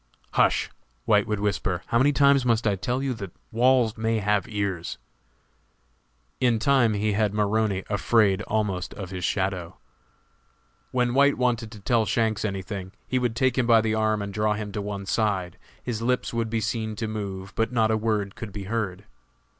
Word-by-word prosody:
"Hush," - - +2 0.3
White 105 -1 +3
would 105 -2 -1
whisper, 100 -3 -1
"how 115 - +1
many 140 +3 +4
times 140 -1 +4
must 115 -2 +1
I 105 -2 +2
tell 125 +7 -2
you 135 -2 0
that 100 -6 -7 0.2
walls 120 -1 +3
may 110 0 +1
have 105 -2 +1
ears?" 100 -5 -3 1.4
In 120 -3 +3
time 120 -1 +3
he 105 +1 0
had 105 0 +1
Maroney 105 -2 +1
afraid 100 0 +2
almost 105 -4 -1
of 95 -3 -7
his 95 - -4
own - - +2
shadow. 95 -3 -2 1.1
When 125 -1 +1
White 140 +2 +4
wanted 120 -3 0
to 105 - -10
tell 110 +1 +1
Shanks 110 0 0
any 95 -3 -2
thing, 95 -1 -6
he 130 - +1
would 120 -2 -1
take 130 +1 +2
him 120 - +1
by 115 -1 +6
the 110 0 0
arm 110 -1 +1
and 100 0 -6
draw 105 0 +1
him 105 -1 -5
to 105 - -3
one 100 -1 -5
side; 95 -4 -1 0.2
his 115 -3 -3
lips 125 +1 0
would 115 -1 -1
be 115 0 -1
seen 110 -1 -2
to 110 +1 -3
move, 100 -3 -5
but 115 +3 0
not 110 -3 +2
a - - +3
word 105 -2 -1
could 115 -3 -7
be 100 0 -6
heard. 100 -2 -3
110 Hz, 190 wpm, -25 LUFS, 100-115 Hz, 1.4 s, by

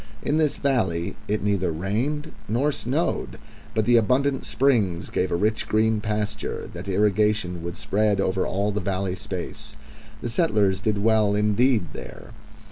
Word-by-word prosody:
In 150 - +1
this 155 -3 +2
valley 110 -12 0
it 105 0 -1
neither 100 -4 +1
rained 120 - -2 0.2
nor 130 +8 +1
snowed, 145 +5 -2 0.4
but 110 -1 +2
the 120 0 +5
abundant 130 +5 +2
springs 110 -11 +1
gave 95 - 0
a - - +2
rich 105 +5 0
green 110 0 +2
pasture, 105 0 -3
that - - -7
irrigation 105 -2 +1
would 85 +1 -5
spread 105 0 +1
over 95 -1 +1
all 100 +3 0
the 105 +1 -2
valley 95 0 -1
space. 90 -5 -7 0.5
The 120 - -2
settlers 105 - +2
did 105 -1 0
well 110 -2 +3
indeed 105 0 +2
there. - - -9
105 Hz, 150 wpm, -24 LUFS, 95-120 Hz, 0.5 s, the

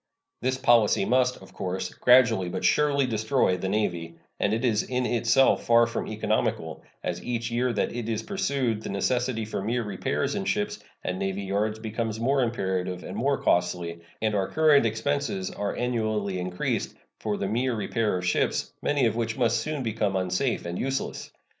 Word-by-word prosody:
This 130 +1 0
policy 120 -6 +4
must, 125 +1 +2
of - - -15
course, 95 0 -3
gradually 120 -7 +4
but - - -3
surely 145 -2 +3
destroy 110 -3 +1
the 95 +1 -3
Navy, 85 -6 -1 0.2
and 100 - +1
it 115 +4 0
is 110 -3 +2
in 125 0 -2
itself 120 +2 +3
far 115 0 +6
from 115 - -3
economical, 110 0 -1 0.2
as 90 0 -3
each 115 -1 -2
year 125 +1 +1
that 105 - -1
it 120 -2 -3
is 110 -2 -1
pursued 135 - -1
the - - -6
necessity 120 +3 0
for 105 - -4
mere 115 +4 -1
repairs 100 -3 -2
in - - -2
ships - - -1 0.2
and 90 +1 -2
navy 95 0 -2
yards 105 +3 -1
becomes 110 0 -3
more 135 +4 +2
imperative 95 -6 -1
and 90 - -7
more 135 +6 +1
costly, 85 -1 0 0.2
and 110 -1 +1
our 100 -2 +1
current 150 -6 +4
expenses 110 -4 -1
are 100 0 -3
annually 110 -6 -1
increased 90 0 -2 0.2
for 105 -2 -2
the 100 - -2
mere 120 +4 0
repair 110 -2 0
of 90 - -4
ships, 90 - 0
many 145 -3 +2
of 110 -1 +1
which 115 -1 -2
must 120 -3 +2
soon 155 -3 -3
become 110 -3 -1
unsafe 95 +7 0
and 85 +1 -4
useless. 135 +1 -3
110 Hz, 180 wpm, -26 LUFS, 95-125 Hz, 0.2 s, far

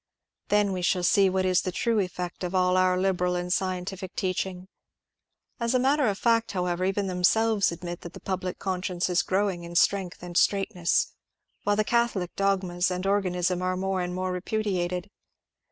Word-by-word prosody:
Then 205 -1 +2
we 185 -1 -2
shall 180 +1 +1
see 195 +2 +4
what 185 0 0
is 185 -1 +3
the 185 - -3
true 230 +4 +1
effect 180 -2 -4
of 180 +1 -3
all 180 0 +3
our 185 0 +3
liberal 180 -1 +1
and 180 0 -1
scientific 185 0 -3
teaching. 185 0 -2 0.9
As 235 +1 0
a - - +4
matter 275 +1 +3
of 200 -2 0
fact, 230 -1 +2
however, 180 -1 -1
even 195 +1 0
themselves 200 +3 +2
admit 175 0 -6
that 175 - -9
the - - -9
public 185 -1 -3
con 185 -2 -2
science 180 -1 -1
is 175 - +3
growing 190 -2 0
in 170 0 -8
strength 180 0 +1
and 175 -1 -8
straightness, 195 -2 +2 0.5
while 205 - +3
the 215 - +2
catholic 230 -6 0
dogmas 185 -2 +1
and 180 +1 -3
organism 180 -2 +1
are 185 0 -1
more 190 0 -1
and 180 0 -3
more 185 0 -2
repudiated. 180 -1 -2
185 Hz, 180 wpm, -27 LUFS, 180-200 Hz, 0.9 s, see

